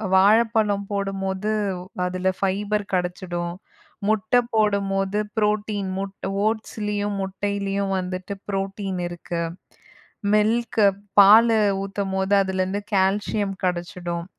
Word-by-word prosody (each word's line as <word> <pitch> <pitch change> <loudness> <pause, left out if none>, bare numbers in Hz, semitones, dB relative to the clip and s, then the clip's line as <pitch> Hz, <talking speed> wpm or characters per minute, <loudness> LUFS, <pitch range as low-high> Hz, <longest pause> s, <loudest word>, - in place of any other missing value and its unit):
வாழப்பழம் 210 0 +4
போடும்போது 195 +1 -2 0.5
அதில 185 +1 0
ஃபைபர் 205 +2 0
கெடச்சிடும், 175 -1 -2 0.5
முட்ட 220 +1 0 0.2
போடும்போது 200 -2 +1 0.2
புரோட்டீன் 210 -2 0
முட் 195 0 -4 0.3
ஓட்ஸ்லேயும் 210 -2 -2
முட்டையிலேயும் 200 0 -2
வந்துட்டு 185 +2 -4 0.2
புரோட்டீன் 195 -1 -3
இருக்கு, 175 0 -5 0.9
மில்க் 225 +2 +2 0.4
பாலு 220 +3 +7 0.2
ஊத்தும்போது 195 0 -1
அதிலேருந்து 190 +1 -1
கால்சியம் 195 +1 +1
கிடைச்சிடும். 175 -1 -3
195 Hz, 85 wpm, -23 LUFS, 190-210 Hz, 0.9 s, பாலு